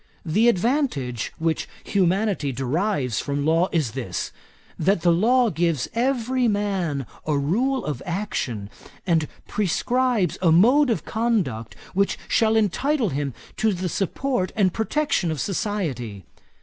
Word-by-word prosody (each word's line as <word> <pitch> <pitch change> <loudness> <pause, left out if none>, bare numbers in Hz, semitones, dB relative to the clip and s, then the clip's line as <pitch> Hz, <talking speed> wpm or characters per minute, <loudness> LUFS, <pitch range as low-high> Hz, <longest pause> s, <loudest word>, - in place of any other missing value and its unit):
The 210 +9 +3
advantage 190 - 0
which 160 0 -1 0.2
humanity 190 -5 +1
derives 135 - -1
from 140 0 -2
law 165 +3 +3
is 155 -9 0
this: 115 -9 -4 0.5
that 185 +2 +2
the 175 - +5
law 230 +7 +3
gives 165 -5 0
every 250 0 +1
man 195 - -1 0.2
a 150 -2 +2
rule 235 - 0
of 145 -4 -3
action, 135 - -3 0.3
and 165 -4 +2 0.2
prescribes 215 - +1
a 170 -3 +4
mode 250 - +5
of 230 - -1
conduct 195 - -1 0.2
which 200 +1 +1
shall 220 -1 +3
entitle 230 - +1
him 140 -4 -3 0.2
to 220 -2 +2
the 180 0 -2
support 200 - -1
and 190 -5 +2
protection 225 - 0
of 155 -2 -2
society. 145 - -2
185 Hz, 130 wpm, -24 LUFS, 145-225 Hz, 0.5 s, the